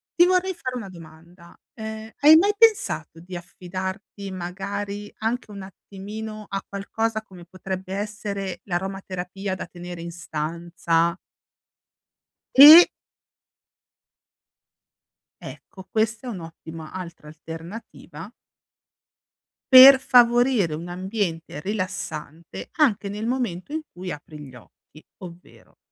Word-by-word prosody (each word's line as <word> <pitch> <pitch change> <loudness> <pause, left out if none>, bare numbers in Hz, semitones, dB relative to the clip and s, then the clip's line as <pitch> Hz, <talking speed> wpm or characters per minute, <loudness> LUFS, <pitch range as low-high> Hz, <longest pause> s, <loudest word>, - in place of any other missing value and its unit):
Ti 350 - +6
vorrei 370 +1 +1
fare 255 -7 -6
una 225 -6 -6
domanda, 170 0 -15 0.2
ehm, 220 0 -8
hai 300 +2 +8
mai 405 +5 +3
pensato 440 - +2
di 180 +2 -10
affidarti 190 +3 -7
magari 200 +3 -5
anche 225 +1 -2
un 200 -1 -8
attimino, 210 +3 -9
a 195 0 -4
qualcosa 220 +2 -3
come 185 -4 -14
potrebbe 185 +1 -6
essere 200 -3 -5
l'aromaterapia 190 0 -4
da - - -6
tenere 175 0 -9
in 170 0 -7
stanza? 170 0 -2 1.4
E 300 +6 +11 2.6
Ecco, 190 -1 -12
questa 220 +2 -1
è - - -3
un'ottima 165 -4 -9
altra 170 -4 -9
alternativa 165 +8 -10 1.4
per 260 +1 +11
favorire 240 -7 +4
un 165 +3 -6
ambiente 175 -5 -4
rilassante, 170 -5 -5
anche 235 - +1
nel 210 +2 -5
momento 240 -4 -3
in 315 - -2
cui 180 0 -8
apri 150 +1 -10
gli 135 -3 -12
occhi. 125 +5 -18 0.2
Ovvero, 175 0 -14
190 Hz, 105 wpm, -23 LUFS, 170-220 Hz, 2.6 s, E